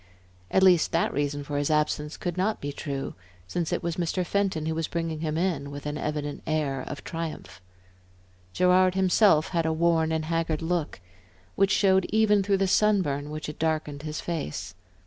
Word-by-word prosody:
At 190 - +3
least 180 -3 +5
that 165 - +1
reason 145 0 -1
for 145 0 -4
his 145 - 0
absence 150 0 0
could 175 -2 -3
not 195 +4 0
be 145 - -4
true, 140 -1 -4 0.3
since 165 - -3
it - - -1
was 170 -1 -2
Mr. 180 +1 -1
Fenton 190 -5 0
who 160 - -1
was 160 0 -2
bringing 165 -2 -3
him 155 -1 -2
in, 165 -6 -1
with 145 0 -8
an 150 0 -3
evident 150 -1 -3
air 150 -4 0
of 145 - -6
triumph. 165 - -6 0.9
Gerard 185 - +4
himself 190 -3 +4
had 165 -3 0
a - - +1
worn 160 0 +2
and 160 -1 -1
haggard 165 -1 -1
look, 165 - -2 0.5
which 195 0 +2
showed 190 -1 +3
even 210 -1 +4
through 195 0 +1
the 195 0 +1
sun 210 0 +3
burn 145 -1 -3
which 155 0 -5
had 150 - -7
darkened 155 -2 -1
his 155 0 -5
face. 90 - -4
160 Hz, 185 wpm, -26 LUFS, 150-180 Hz, 0.9 s, least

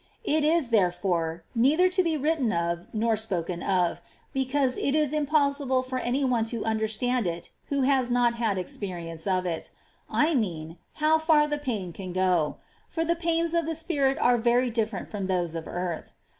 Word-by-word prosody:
It 310 0 +1
is, 310 -4 +2
therefore, 175 -5 +1
neither 290 +10 +4
to 370 +1 +2
be 330 -3 0
written 295 -5 +1
of 170 0 -2
nor 225 +1 +1
spoken 180 -5 -2
of, 180 -3 0 0.3
because 265 -1 +1
it 280 - 0
is 305 -2 +1
impossible 280 -3 +1
for 255 0 -3
any 255 +3 0
one 245 -3 +2
to 230 0 -4
understand 220 +1 0
it 170 0 -5 0.2
who 280 -2 0
has 260 -2 +2
not 240 -1 +3
had 220 -4 0
experience 175 -3 -5
of 185 -1 +1
it, 165 -2 -3 0.3
— - - -39 0.2
I 330 - +1
mean, 165 - -2
how 310 +1 +3
far 315 -2 +4
the 295 0 -2
pain 215 -11 -3
can 185 -1 -7
go; 180 -4 +1 0.3
for 325 -1 -1
the 340 +1 +1
pains 335 0 0
of 335 -2 +1
the 325 - -2
spirit 290 -4 +1
are 245 0 +3
very 240 +2 +2
different 220 -3 -2
fi^om 200 -3 -4
those 175 -3 0
of 165 -1 -5
earth. 175 -2 -4
240 Hz, 185 wpm, -27 LUFS, 185-290 Hz, 0.3 s, neither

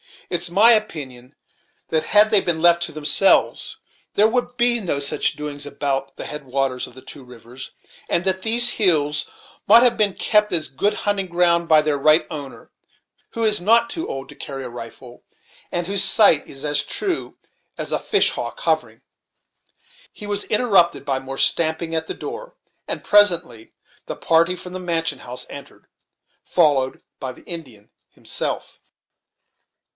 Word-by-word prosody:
"It's 175 0 -2
my 205 +7 +5
opinion 145 - -2 0.5
that, 160 -1 0
had 210 +1 +5
they 210 - +6
been 165 -2 -1
left 170 0 +4
to - - -6
themselves, 155 +6 +1 0.4
there 215 +2 +4
would 245 +1 -2
be 240 -1 +3
no 180 -9 -2
such 140 - 0
doings 145 -1 -7
now 145 - -8
about 135 -1 -3
the - - -7
head 150 -1 -7
waters 130 -1 -2
of 125 - -16
the 130 - -13
two 140 - -12
rivers, 125 +1 -12 0.4
and 170 - +1
that 190 0 -1
these 235 +4 +3
hills 150 -7 +1 0.4
mought 230 +4 +7
have 240 -2 +3
been 210 -3 +1
kept 210 -1 +1
as 160 -3 -1
good 170 +10 -1
hunting 200 -2 0
ground 170 -1 +1
by 155 -1 +5
their 150 -2 -1
right 155 +3 +4
owner, 145 -4 -9 0.6
who 230 - -4
is 215 -3 +1
not 230 +5 +3
too 330 - -4
old 135 0 -6
to - - -12
carry 135 -1 -7
a 125 - -7
rifle, 120 +1 -11 0.5
and 175 0 -1
whose 200 +1 +2
sight 195 -6 +5
is 135 +1 -7
as 145 -1 +1
true 375 -4 -3 0.4
as - - -5
a - - 0
fish - - +2
hawk - - -6
hovering - - -1 0.6
" - - -44 0.3
He 210 - -8
was 205 0 -3
interrupted 210 -6 +2
by 135 -1 -1
more 135 0 -8
stamping 160 +2 +1
at 160 0 -1
the - - -5
door, - - -8 0.3
and - - -4
presently 175 - +2 0.3
the - - -4
party 165 +2 +2
from 180 0 -10
the 185 - -5
mansion 165 -2 -2
house 125 0 -7
entered, - - -12 0.6
followed 145 -6 +1 0.2
by 130 -1 -5
the - - -17
Indian 130 - -9 0.2
himself. - - -5
170 Hz, 170 wpm, -21 LUFS, 140-205 Hz, 0.6 s, mought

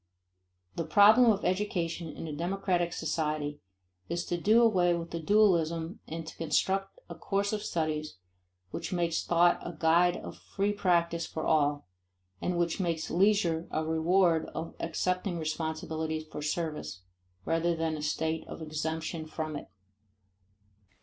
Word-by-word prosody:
The 165 - 0
problem 210 +9 +6
of 205 -1 -1
education 180 -3 -1
in 155 - -7
a 155 - -5
democratic 175 +1 0
society 150 -3 -2 0.5
is 170 +1 -2
to 175 - -1
do 225 +5 +5
away 180 -6 +4
with 170 0 -5
the 170 - -3
dualism 170 -2 +2
and 165 0 -5
to - - -9
construct 195 +4 0
a - - -7
course 200 +1 -1
of 210 - -1
studies 155 - -2 0.6
which - - -5
makes 170 -2 0
thought 175 0 +4
a 175 - -6
guide 170 +2 +4
of - - -9
free 200 +1 -1
practice 170 -4 +1
for 160 - -4
all 145 -2 +2 0.6
and 180 -1 -1
which 170 +1 0
makes 170 -4 -1
leisure 175 -3 +2
a 155 0 -1
reward 165 +1 +2
of 165 - -4
accepting 180 +2 -1
responsibility 160 0 -3
for 155 -1 -8
service, 150 - -3 0.4
rather 165 +1 +1
than 160 -1 -1
a 150 - -5
state 160 +1 -1
of - - -8
exemption 160 +1 -4
from 155 -1 -4
it. 145 - -7
165 Hz, 145 wpm, -30 LUFS, 160-180 Hz, 0.6 s, problem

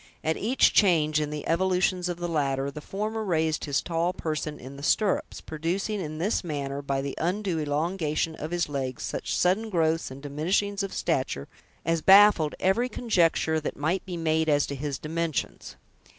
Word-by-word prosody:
At 160 0 +1
each 245 +6 +3
change 155 -6 +4
in 150 - -2
the 150 -1 -5
evolutions 180 +1 +1
of 175 - -3
the 175 0 -3
latter, 140 -4 0
the 150 - -8
former 215 +6 -3
raised 160 -5 0
his 140 -2 0
tall 170 +1 0
person 155 -3 -3
in 130 +2 -10
the 140 - -10
stirrups; 195 +6 0
producing, 185 +7 -2
in 155 -2 -5
this 195 +7 0
manner, 140 -4 -3
by 140 -1 -2
the 140 - -3
undue 180 0 -1
elongation 155 +1 -1
of 155 0 -6
his 175 0 0
legs, 135 -4 -4
such - - -3
sudden 195 +5 +2
growths 165 -3 +1
and 135 +2 -10
diminishings 185 +8 0
of 195 - -2
the - - -7
stature, 130 - -1 0.4
as 165 0 +1
baffled 195 -5 +6
every 230 +7 +2
conjecture 170 -9 +1
that 155 - -5
might 160 +6 0
be 180 -2 -6
made 160 -1 +1
as 145 -1 +3
to 140 - -5
his 140 0 -3
dimensions. 160 +1 -3
160 Hz, 180 wpm, -27 LUFS, 150-185 Hz, 0.4 s, baffled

